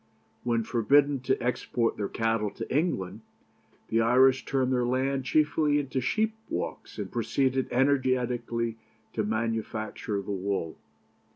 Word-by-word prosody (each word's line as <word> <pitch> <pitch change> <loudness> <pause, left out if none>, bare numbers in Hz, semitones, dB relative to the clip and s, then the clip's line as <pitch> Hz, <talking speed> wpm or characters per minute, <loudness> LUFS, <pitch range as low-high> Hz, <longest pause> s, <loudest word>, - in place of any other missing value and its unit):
When 115 -1 +1
forbidden 140 +5 +3
to 130 +1 0
export 120 -1 0
their 100 - -2
cattle 115 -2 0
to 125 - -5
England, 110 - -1 0.7
the 115 0 +2
Irish 130 +3 +4
turned 130 -1 +1
their 125 -1 +2
land 130 +2 0
chiefly 150 +2 +2
into 135 -2 -1
sheep 220 - +1 0.2
walks, - - -4
and - - -5
proceeded 130 -1 0
energetically 125 -3 +1 0.4
to 110 - 0
manufacture 110 -1 -2
the 100 - -5
wool. 95 -4 -2
125 Hz, 125 wpm, -28 LUFS, 115-135 Hz, 0.7 s, Irish